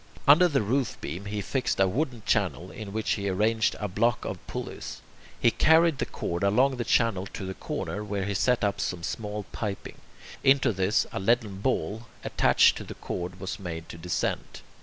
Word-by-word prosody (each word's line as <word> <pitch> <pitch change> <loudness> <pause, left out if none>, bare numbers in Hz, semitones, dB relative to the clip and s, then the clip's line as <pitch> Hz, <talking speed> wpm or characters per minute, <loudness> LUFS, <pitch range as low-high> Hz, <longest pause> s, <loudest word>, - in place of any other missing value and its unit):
Under 160 +6 +8
the 140 -8 +1
roof 130 +5 0
beam 85 +8 -6
he 105 +1 -3
fixed 125 +2 -1
a 95 - +5
wooden 120 +2 -2
channel 95 -4 0
in 105 -2 -7
which 110 +1 -1
he 100 -1 0
arranged 110 +4 +2
a 105 - -2
block 110 +5 +1
of - - -4
pulleys. - - -6 0.4
He 115 - +4
carried 160 0 +4
the - - -1
cord 85 +2 -3
along 125 +7 +3
the 120 - -1
channel 110 -5 +2
to 95 - -7
the 95 - -4
corner, 105 +2 -4
where 100 -2 -2
he 100 - -1
set 120 +4 +2
up 100 -1 0
some 90 -2 -3
small 105 +1 -4
piping. 105 -3 -5 0.4
Into 135 -3 +4
this 95 +3 +2
a - - -3
leaden 105 -1 +1
ball, 110 0 -1 0.2
attached - - +4
to - - -6
the - - -9
cord, 90 +1 -5
was 95 +2 -5
made 80 -3 -6
to 85 - -9
descend. 90 +1 -2
105 Hz, 190 wpm, -27 LUFS, 95-120 Hz, 0.4 s, Under